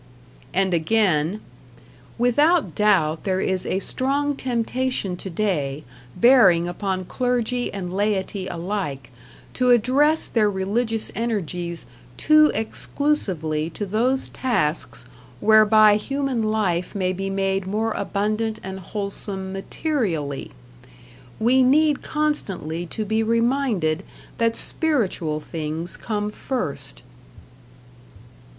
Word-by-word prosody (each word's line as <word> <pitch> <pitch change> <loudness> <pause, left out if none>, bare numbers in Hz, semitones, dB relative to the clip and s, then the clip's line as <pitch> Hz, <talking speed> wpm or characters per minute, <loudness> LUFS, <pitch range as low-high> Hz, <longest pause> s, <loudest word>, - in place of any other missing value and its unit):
And 190 +3 +1
again: 175 0 +1 0.8
Without 255 - +3
doubt 175 -7 +2
there 190 -1 0
is 190 -1 -1
a - - 0
strong 280 +7 0
temptation 250 -5 -1
today, 165 -7 -2 0.3
bearing 190 -7 +5
upon 185 +1 -3
clergy 245 +2 -1
and 185 -2 -5
laity 200 -1 -1
alike, 170 -8 -4 0.4
to 250 -1 +1
address 270 +6 +4
their 215 -3 +2
religious 215 +4 -2
energies 180 -7 -3 0.3
too 305 0 +5
exclusively 190 - -1
to 205 +5 -5
those 240 +7 0
tasks 150 - -1 0.3
whereby 215 -1 +6
human 275 +1 -2
life 210 -6 0
may 185 -2 0
be 195 +1 -3
made 195 -1 -1
more 220 +3 -1
abundant 215 +2 -1
and 190 0 -6
wholesome 195 0 -5
materially.... 195 - -2 0.9
We 245 +4 +4
need 290 +3 +4
constantly 195 - -2
to 215 +5 -4
be 220 +2 +1
reminded 230 - +1 0.4
that 230 0 +2
spiritual 200 - -1
things 160 +2 -4
come 210 -2 -3
first. 145 - -4
205 Hz, 100 wpm, -23 LUFS, 180-245 Hz, 0.9 s, whereby